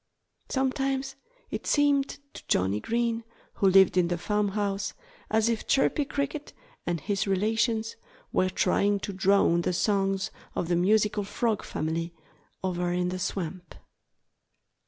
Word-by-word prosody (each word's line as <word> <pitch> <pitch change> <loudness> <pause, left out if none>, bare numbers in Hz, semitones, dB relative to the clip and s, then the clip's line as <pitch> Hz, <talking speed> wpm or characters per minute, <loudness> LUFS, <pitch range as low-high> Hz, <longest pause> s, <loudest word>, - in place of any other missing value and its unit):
Sometimes 270 0 -1 0.4
it - - -4
seemed 285 -2 +3 0.3
to - - -9
Johnnie 95 +3 +1
Green, 230 - -1 0.3
who 195 - +3
lived 190 0 +6
in 175 -1 +4
the 175 0 -1
farmhouse, 205 +1 -1 0.3
as 220 0 +2
if 230 -1 -1
Chirpy 280 +2 +2
Cricket 285 +1 -3 0.3
and 175 -1 0
his 200 +6 -1
relations 220 +3 0 0.4
were 185 - +2
trying 200 +2 +2
to 200 - -4
drown 190 -2 +3
the 180 - -1
songs 195 0 +1 0.2
of 170 - -2
the 175 - +3
musical 210 +3 +2
Frog 220 +2 -1
family, 165 +2 -3 0.5
over 180 -1 -1
in 180 0 0
the 185 0 -4
swamp. 180 -1 -4
200 Hz, 135 wpm, -27 LUFS, 180-230 Hz, 0.5 s, lived